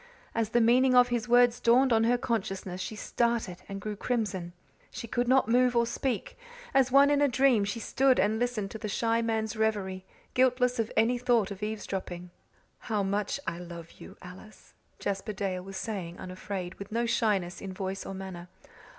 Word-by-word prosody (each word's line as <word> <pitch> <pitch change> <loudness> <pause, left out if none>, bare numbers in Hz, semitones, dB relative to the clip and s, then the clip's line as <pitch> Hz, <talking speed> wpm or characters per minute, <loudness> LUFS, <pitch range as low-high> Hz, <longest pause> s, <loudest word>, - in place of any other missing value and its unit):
As 225 -2 0
the 240 +1 +3
meaning 255 +3 +4
of 245 0 +6
his 240 0 -2
words 245 0 +5
dawned 250 +2 +4
on 225 0 +3
her 245 +1 +3
consciousness 195 -6 -3
she 215 - -5
started 230 -4 -1
and 195 0 -5
grew 210 +1 -5
crimson. 205 -6 -2 0.4
She 230 - -7
could 245 +2 -1
not 260 -1 +4
move 250 +1 +3
or 235 0 +4
speak; 265 - -3 0.3
as 265 -1 +3
one 280 +2 +6
in 290 0 +3
a 290 - +5
dream 255 -5 +3
she 205 +3 -3
stood 265 +2 +2
and 215 +2 +2
listened 235 -5 -2
to 220 - -7
the 215 - -4
shy 230 +2 +1
man's 220 -1 -1
reverie, 205 -4 -1 0.3
guiltless 250 -1 +2
of 225 -1 -1
any 235 +3 +3
thought 240 -5 +2
of 200 0 -7
eavesdropping. 190 -4 -5 0.5
"How 215 -3 -1
much 200 +6 -1
I 170 0 -3
love 170 -1 -9
you, - - -12
Alice," 185 +4 -13 0.2
Jasper 200 +2 -3
Dale 190 -2 -3
was 195 +1 -8
saying, 185 -4 -5
unafraid, 185 0 -6
with 200 +1 -8
no 235 +2 0
shyness 200 -6 0
in 195 - -6
voice 190 +1 -4
or 195 - -6
manner. 190 -2 -7
220 Hz, 185 wpm, -29 LUFS, 195-245 Hz, 0.5 s, of